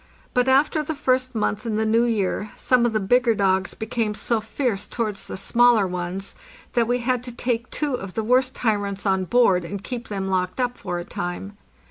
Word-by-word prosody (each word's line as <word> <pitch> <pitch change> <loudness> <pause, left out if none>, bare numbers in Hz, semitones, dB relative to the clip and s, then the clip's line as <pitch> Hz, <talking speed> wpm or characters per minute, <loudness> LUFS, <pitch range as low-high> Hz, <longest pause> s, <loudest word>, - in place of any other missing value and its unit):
But 250 +1 +2
after 285 +4 +3
the 305 +1 -4
first 255 -3 0
month 210 -1 -1
in 225 -3 -2
the 220 +1 +1
new 225 +2 +3
year 210 -2 -1
some 245 -2 +3
of - - -1
the 215 - +2
bigger 235 +3 +3
dogs 190 -2 +1
became 220 -1 -2
so 225 +1 0
fierce 220 -2 -2
towards 215 -4 -3
the - - -6
smaller 235 +1 +4
ones 180 +1 -4 0.4
that 235 -2 +2
we 245 +1 +1
had 250 0 0
to 245 - -5
take 240 0 -2
two 295 -3 -1
of 195 -7 -5
the 220 - -1
worst 255 +3 +2
tyrants 205 -3 -1
on 190 -1 +1
board 195 -5 +3
and 195 +3 -6
keep 240 -2 -5
them 195 -2 -3
locked 185 +2 -1
up 245 -1 0
for 175 - -4
a 175 - -5
time. 180 +4 -5
220 Hz, 205 wpm, -23 LUFS, 195-245 Hz, 0.4 s, smaller